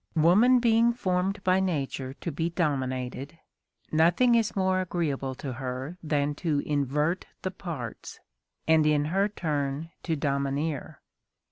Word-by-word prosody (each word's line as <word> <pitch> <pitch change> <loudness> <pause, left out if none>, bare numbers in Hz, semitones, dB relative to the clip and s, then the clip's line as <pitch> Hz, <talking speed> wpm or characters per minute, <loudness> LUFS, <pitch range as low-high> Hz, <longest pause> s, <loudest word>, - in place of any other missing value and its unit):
Woman 195 +11 +5
being 235 0 +4
formed 190 -2 -1
by 185 0 +3
nature 140 -7 -2
to 170 - -3
be 165 +3 -1
dominated, 135 -3 -2 0.5
nothing 175 +10 +4
is 230 -2 +2
more 185 -1 +2
agreeable 145 -7 -2
to 130 0 -5
her 130 +5 -5
than 145 -2 0
to 160 -5 +1
invert 150 +4 0 0.2
the 185 - -1
parts, 165 - -7 0.5
and 160 -1 +5
in 150 -1 +3
her 200 +2 +2
turn 150 -4 -2
to 165 - -1
domineer. 140 +1 -2
160 Hz, 130 wpm, -27 LUFS, 140-185 Hz, 0.5 s, Woman